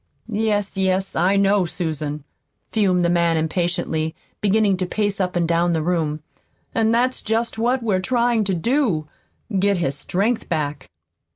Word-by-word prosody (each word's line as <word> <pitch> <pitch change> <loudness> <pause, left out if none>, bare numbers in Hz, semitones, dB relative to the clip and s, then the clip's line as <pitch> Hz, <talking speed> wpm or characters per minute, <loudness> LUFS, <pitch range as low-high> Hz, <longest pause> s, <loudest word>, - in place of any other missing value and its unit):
"Yes, 205 -2 0
yes, 190 0 0
I 185 +4 +3
know, 200 -2 +3
Susan," 155 -4 -3 0.5
fumed 190 -5 +2
the - - +3
man 170 -1 +2
impatiently, 160 -1 -1 0.3
beginning 210 -1 +3
to 185 -1 -2
pace 205 0 0
up 180 -1 -1
and 170 -1 +1
down 170 +1 +2
the 160 -2 0
room. 160 -3 -1 0.5
"And 225 -1 +2
that's 250 +2 +1
just 225 +1 -1
what 245 +2 +1
we're 200 -5 +1
trying 235 +2 +1
to 190 -1 0
do 200 - 0 0.5
get 200 0 +2
his 150 -6 0
strength 200 - -1
back." 150 -4 -2
185 Hz, 155 wpm, -22 LUFS, 165-215 Hz, 0.5 s, I